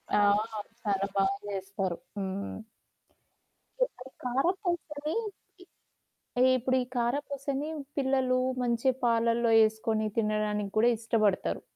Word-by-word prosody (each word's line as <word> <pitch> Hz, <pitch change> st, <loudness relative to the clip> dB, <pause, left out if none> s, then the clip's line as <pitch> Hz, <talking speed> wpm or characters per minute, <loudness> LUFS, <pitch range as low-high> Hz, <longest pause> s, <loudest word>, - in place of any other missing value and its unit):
ఆ! -, -, +5 dB, 0.6 s
చాలా 195 Hz, -1 st, 0 dB
బాగా 195 Hz, +7 st, +3 dB
చేస్తారు. 195 Hz, -2 st, -3 dB, 0.2 s
హ్మ్. 195 Hz, +1 st, -3 dB, 1.3 s
ఇప్పుడీ -, -, -16 dB, 0.3 s
కారప్పూసని, 310 Hz, -, -1 dB, 1.3 s
ఇ -, -, +7 dB
ఇప్పుడు 255 Hz, +1 st, 0 dB
ఈ -, -, -8 dB
కారప్పూసని, 280 Hz, +3 st, -1 dB, 0.3 s
పిల్లలు 265 Hz, -2 st, +2 dB, 0.2 s
మంచి 240 Hz, +2 st, +2 dB
పాలల్లో 230 Hz, 0 st, +3 dB
ఏసుకొని, 220 Hz, 0 st, -1 dB
తినడానికి 210 Hz, -2 st, 0 dB
కూడా 230 Hz, +2 st, +5 dB
ఇష్టపడతారు. 215 Hz, -3 st, +1 dB
230 Hz, 90 wpm, -29 LUFS, 210-265 Hz, 1.3 s, ఇ